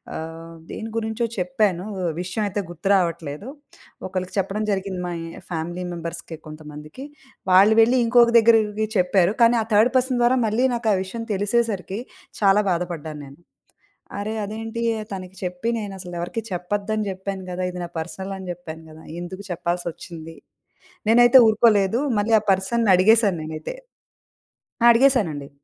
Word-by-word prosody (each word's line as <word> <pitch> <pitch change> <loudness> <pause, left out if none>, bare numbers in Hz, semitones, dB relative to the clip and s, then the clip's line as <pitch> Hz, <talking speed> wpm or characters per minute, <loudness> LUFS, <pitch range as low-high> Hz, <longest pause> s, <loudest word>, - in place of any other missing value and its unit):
ఆహ్, 165 +1 -7 0.2
దేని 225 0 -6
గురించో 225 +1 -1
చెప్పాను 185 -1 0 0.4
విషయమయితే 200 +2 -2
గుర్తు 175 +3 -6
రావట్లేదు. 170 - -1 0.6
ఒకళ్ళకి 185 -1 -4
చెప్పడం 195 +3 -1
జరిగింది 190 -2 -2
మా 175 - -3
ఇ - - -6 0.3
ఫ్యామిలీ 175 +2 -4
మెంబర్స్‌కి 170 -1 -6
కొంతమందికి. 155 - -10 0.5
వాళ్ళు 200 +4 +6
వెళ్లి 245 +3 +4
ఇంకొక 235 0 +5
దగ్గరివివి 220 -2 +4
చెప్పారు. 180 0 +3
కానీ 235 +1 +6
ఆ - - 0
థర్డ్ 220 +4 +5
పర్సన్ 255 -1 +1
ద్వారా 245 +2 +4
మళ్ళీ 220 +4 +1
నాకా 230 -2 0
విషయం 230 +5 -6
తెలిసేసరికి 205 -1 -1 0.4
చాలా 205 +1 +4
బాధపడ్డాను 170 -4 -3
నేను. 140 +3 -14 0.8
అరె! 210 +2 -3
అదేంటి 225 +2 -5 0.3
తనకి 185 -1 -7
చెప్పి 180 +5 -3
నేను 205 -3 -5
అసలెవరికీ 175 +4 -4
చెప్పొద్దని 205 +4 -2
జెప్పాను 190 0 -5
గదా! 180 +1 -4
ఇది 180 - -6
నా 170 - -6
పర్సనల్ 185 +4 -6
అని 190 - -9
చెప్పాను 165 -2 -10
గదా! 155 +1 -14 0.2
ఎందుకు 185 +3 -7
చెప్పాల్సొచ్చింది. 170 -2 -5 0.8
నేనైతే 240 +2 +7
ఊరుకోలేదు 215 0 +3 0.2
మళ్ళీ 220 +2 +3
ఆ - - -17
పర్సన్‌ని 195 +3 +1
అడిగేసాను 205 -1 +4
నేనైతే. 155 - -6 1.1
ఆ! - - +6
అడిగేసానండి. 220 - +2
190 Hz, 135 wpm, -23 LUFS, 175-220 Hz, 1.1 s, నేనైతే